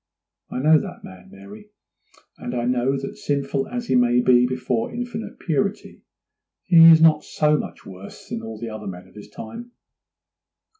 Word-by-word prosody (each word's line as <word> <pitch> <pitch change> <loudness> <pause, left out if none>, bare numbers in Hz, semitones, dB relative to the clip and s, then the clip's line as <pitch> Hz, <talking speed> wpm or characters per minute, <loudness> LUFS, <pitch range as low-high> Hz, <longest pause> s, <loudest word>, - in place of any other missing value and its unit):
I - - -6
know 155 +4 +4
that 185 -3 -9
man, 95 -1 -13
Mary, 100 +2 -14 0.7
and 120 - -6
I 120 -1 -2
know 125 +2 0
that 135 0 -7
sinful 140 -1 -2
as 245 -1 -5
he - - -1
may 125 -1 +3
be 125 0 +4
before 125 -2 -2
Infinite 240 -1 -6
Purity, 200 +5 -3 0.6
he 170 -3 +7
is 160 -1 +8
not 155 -2 +5
so 150 0 +1
much - - -6
worse 95 +1 -12
than - - -4
all 110 -1 -8
the 115 - -6
other 110 -1 -8
men 90 -1 -8
of 95 - -22
his 105 - -13
time. 240 - -10
130 Hz, 170 wpm, -22 LUFS, 110-160 Hz, 0.7 s, is